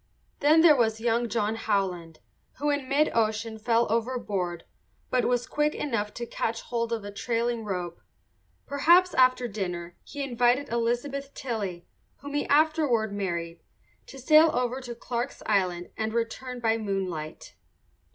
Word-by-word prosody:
Then 310 +3 +5
there 320 -3 +7
was 225 -3 +1
young 235 +1 +1
John 215 -1 0
Howland, 190 -7 -2 0.3
who 295 +2 -1
in 285 -2 -2
mid 290 +3 +3
ocean 220 0 0
fell 230 +1 +2
overboard 210 -7 -2 0.5
but 250 -1 +2
was 245 -1 +1
quick 300 +3 0
enough 210 -7 -2
to 240 - -4
catch 230 -1 -3
hold 235 -1 -3
of 225 -3 -2
a 205 - -6
trailing 235 +2 -1
rope. 180 -4 -4 0.6
Perhaps 340 +6 +4
after 255 -1 +4
dinner 180 -5 -5
he 285 - -6
invited 250 +1 +1
Elizabeth 245 +4 -2
Tilley, 205 -9 -4 0.3
whom 285 +1 -9
he 290 - -1
afterward 290 -8 +2
married, 170 -4 -3 0.5
to 270 - -11
sail 310 +4 +6
over 250 +1 -1
to 240 -2 -7
Clarke's 240 +2 -4
Island 180 -4 0
and 220 0 -2
return 245 +2 -3
by 225 -1 +1
moonlight. 185 -7 -4
235 Hz, 145 wpm, -27 LUFS, 205-260 Hz, 0.6 s, there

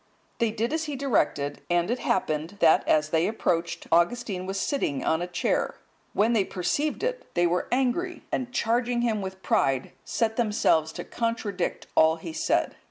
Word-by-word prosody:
They 230 -2 +2
did 230 +5 -2
as 320 0 -1
he 295 -2 -4
directed; 175 - 0
and 175 +3 +2
it 245 - -1
happened, 155 +6 -1
that 160 -1 +5
as 155 0 +3
they 165 +2 +2
approached, 175 -6 -1
Augustine 185 +2 +1
was 195 0 -2
sitting 145 - -1
on 160 +1 +1
a 175 - -2
chair. 180 - 0 0.4
When 220 +4 +3
they 215 -4 +3
perceived 285 - -1
it, - - -3
they 175 0 +3
were 175 +1 0
angry, 270 +8 0
and 250 -1 -2
charging 240 0 +1
him 220 -3 +1
with 190 0 -7
pride, 135 -1 +1
set 225 -2 -1
themselves 205 -9 +2
to - - -5
contradict 225 -6 -2
all 160 0 +5
he 165 0 -8
said. - - 0
205 Hz, 170 wpm, -26 LUFS, 170-240 Hz, 0.4 s, that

